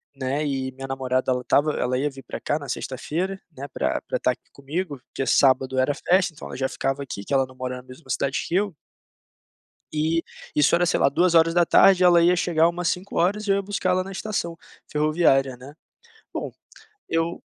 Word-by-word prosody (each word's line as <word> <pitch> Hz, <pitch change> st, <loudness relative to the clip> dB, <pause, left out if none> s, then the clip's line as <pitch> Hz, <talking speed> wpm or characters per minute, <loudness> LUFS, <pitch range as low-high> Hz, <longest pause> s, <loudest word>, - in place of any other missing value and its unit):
né. 135 Hz, +3 st, -2 dB
E, 135 Hz, -2 st, -2 dB
minha 135 Hz, +1 st, -8 dB
namorada 130 Hz, -1 st, -1 dB
ela 125 Hz, -, 0 dB
estava 145 Hz, +4 st, +2 dB
ela 125 Hz, +1 st, -1 dB
ia 145 Hz, +1 st, 0 dB
vir 135 Hz, -1 st, -12 dB
pra -, -, -7 dB
cá 150 Hz, -, -1 dB
na 145 Hz, -2 st, -8 dB
sexta-feira, 175 Hz, +9 st, -3 dB
né, 140 Hz, -2 st, -8 dB
pra -, -, -1 dB
pra -, -, -2 dB
estar -, -, +1 dB
aqui -, -, -11 dB
comigo, 145 Hz, 0 st, -4 dB
porque 135 Hz, -, -4 dB
sábado 130 Hz, -1 st, +3 dB
era 130 Hz, +3 st, +2 dB
festa, 180 Hz, +4 st, +2 dB
então 150 Hz, -, -9 dB
ela -, -, -8 dB
já 130 Hz, 0 st, -1 dB
ficava 135 Hz, +1 st, -2 dB
aqui, 100 Hz, -6 st, -7 dB
que -, -, -4 dB
ela 135 Hz, -1 st, +3 dB
não 130 Hz, -, -16 dB
mora 130 Hz, 0 st, -4 dB
na 125 Hz, -, -10 dB
mesma 130 Hz, +5 st, -15 dB
cidade 140 Hz, 0 st, 0 dB
que 170 Hz, -, -2 dB
eu 200 Hz, 0 st, +1 dB, 1.2 s
E 160 Hz, +2 st, +1 dB, 0.3 s
isso 150 Hz, +2 st, +4 dB
era, 175 Hz, +1 st, +3 dB
sei -, -, +1 dB
lá, -, -, +4 dB
14h 170 Hz, +3 st, +4 dB
e -, -, +5 dB
ela 175 Hz, -1 st, +6 dB
ia 175 Hz, +1 st, +5 dB
chegar 165 Hz, -1 st, +3 dB
umas 175 Hz, 0 st, -2 dB
17h 195 Hz, +3 st, 0 dB
e -, -, 0 dB
eu 195 Hz, -, +4 dB
ia 200 Hz, -, -1 dB
buscá-la 185 Hz, -2 st, 0 dB
na 195 Hz, -, -8 dB
estação 190 Hz, -4 st, -3 dB, 0.3 s
ferroviária, 150 Hz, -4 st, +2 dB
né. 135 Hz, +4 st, -12 dB, 0.6 s
Bom, -, -, -4 dB, 0.6 s
eu 165 Hz, +1 st, -1 dB
150 Hz, 200 wpm, -24 LUFS, 135-175 Hz, 1.2 s, ela